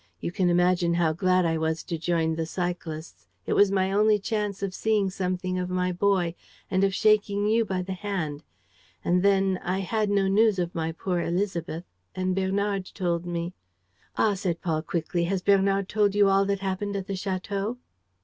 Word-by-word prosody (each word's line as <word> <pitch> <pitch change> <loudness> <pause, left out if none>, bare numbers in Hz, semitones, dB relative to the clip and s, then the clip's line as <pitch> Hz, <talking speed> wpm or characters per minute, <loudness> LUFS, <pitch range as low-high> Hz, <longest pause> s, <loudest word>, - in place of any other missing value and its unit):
You - - -3
can 180 0 +1
imagine 175 -1 +3
how 165 -2 +2
glad 185 +2 +2
I 165 -1 +1
was 160 0 -1
to 170 - -4
join 165 0 0
the 160 0 -2
cyclists. 165 - -5 0.2
It - - 0
was 200 -1 +5
my 190 -1 +1
only 210 +1 +4
chance 205 -1 -3
of 195 -2 -2
seeing 210 -2 +1
something 185 -1 -2
of 180 0 -3
my 180 0 0
boy 180 -2 +1 0.4
and 190 +1 +2
of 195 -1 +2
shaking 205 -1 +3
you 225 +2 +3
by 185 -2 -2
the 190 +1 -4
hand.... 180 -7 -3 0.6
And 180 +1 +3
then 195 -1 +3
I 185 +2 -1
had 215 +2 0
no 200 -1 +2
news 210 +1 +4
of 175 -1 -2
my 165 -1 -2
poor 175 +2 -2
Élisabeth; 170 -2 -2 0.3
and 185 0 -1
Bernard 195 0 0
told 175 -2 -1
me... 170 0 -3 0.3
." 95 +1 -34
"Ah," 215 - +3
said 185 -3 -2
Paul 160 -3 0
quickly, 170 +1 -1
"has 185 +1 -1
Bernard 195 -1 +3
told 205 -1 +1
you 205 -1 +5
all 195 0 +4
that 200 0 -1
happened 195 +1 -2
at 195 -1 -3
the 200 - -4
château?" 195 +4 -3
185 Hz, 190 wpm, -26 LUFS, 175-200 Hz, 0.6 s, was